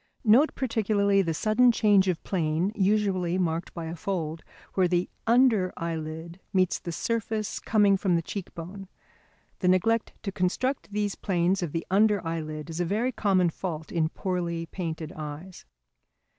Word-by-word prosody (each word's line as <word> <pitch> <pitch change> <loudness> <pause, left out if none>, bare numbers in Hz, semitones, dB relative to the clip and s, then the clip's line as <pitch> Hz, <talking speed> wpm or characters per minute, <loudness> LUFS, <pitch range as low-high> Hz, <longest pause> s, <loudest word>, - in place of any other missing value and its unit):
Note 245 +7 +5
particularly 210 -5 +2
the 170 -3 -1
sudden 215 +9 +4
change 205 -4 +4
of 180 -3 -1
plane 170 +1 0
usually 190 -3 +1
marked 170 -1 -1
by 170 -2 -4
a 165 +1 -5
fold, 165 -3 -3 0.3
where 185 -2 +3
the 175 0 +1 0.2
under 230 -6 +4
eyelid 165 +1 -5
meets 185 -2 +2
the 170 - -6
surface 220 +2 -2
coming 205 -3 +3
from 185 -2 +1
the 165 - 0
cheek 195 +2 -6
bone. 190 +4 -8 0.7
The 185 - 0
neglect 215 +5 +2
to 200 - -3
construct 205 +8 -1
these 205 -1 -1
planes 185 0 0
of 170 -4 -2
the 165 +1 -3
under 210 +1 +4
eyelid 155 -1 -4
is 165 - -5
a - - +2
very 220 +8 0
common 190 -6 +2
fault 160 -3 -5
in 160 -2 +1
poorly 170 -2 -2
painted 165 -2 -5
eyes. 155 +4 -8
185 Hz, 155 wpm, -27 LUFS, 165-205 Hz, 0.7 s, Note